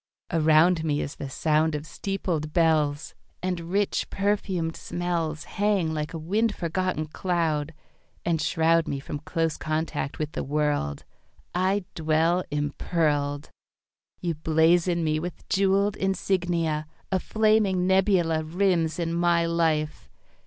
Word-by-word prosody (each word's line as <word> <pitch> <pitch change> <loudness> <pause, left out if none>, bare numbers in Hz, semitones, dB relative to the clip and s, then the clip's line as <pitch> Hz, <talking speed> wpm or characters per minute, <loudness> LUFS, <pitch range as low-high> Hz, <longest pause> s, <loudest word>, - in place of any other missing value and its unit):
Around 160 +1 +4
me 150 -2 0
is 140 - -4
the 140 - -5
sound 155 +2 +1
of 150 +1 -4
steepled 165 -5 -3
bells, 155 -3 +2 0.3
And 175 -2 -2
rich 200 +1 0
perfumed 195 -5 -1
smells 170 -3 -3
Hang 200 -6 0
like 150 0 -3
a 165 - -5
wind 205 +7 0
forgotten 175 -2 -1
cloud, 160 -2 -1 0.5
And 165 -2 +1
shroud 165 +1 +2
Me 140 - -2
from 145 +1 -6
close 165 +1 -1
contact 155 -3 -2
with 155 -1 -3
the - - -3
world. 145 - -1 0.5
I 185 +2 +1
dwell 160 +3 +2
impearled. 145 0 -1 0.7
You 170 -2 -1
blazon 165 +3 +2
me 155 -1 +1
with 175 +2 -7
jewelled 195 +1 +2
insignia. 175 -5 0 0.2
A 190 - +2
flaming 215 -3 +2
nebula 185 -4 +3
Rims 170 -1 +1
in 165 -1 -1
my 170 0 +2
life. 160 -2 0
165 Hz, 125 wpm, -26 LUFS, 155-180 Hz, 0.7 s, Around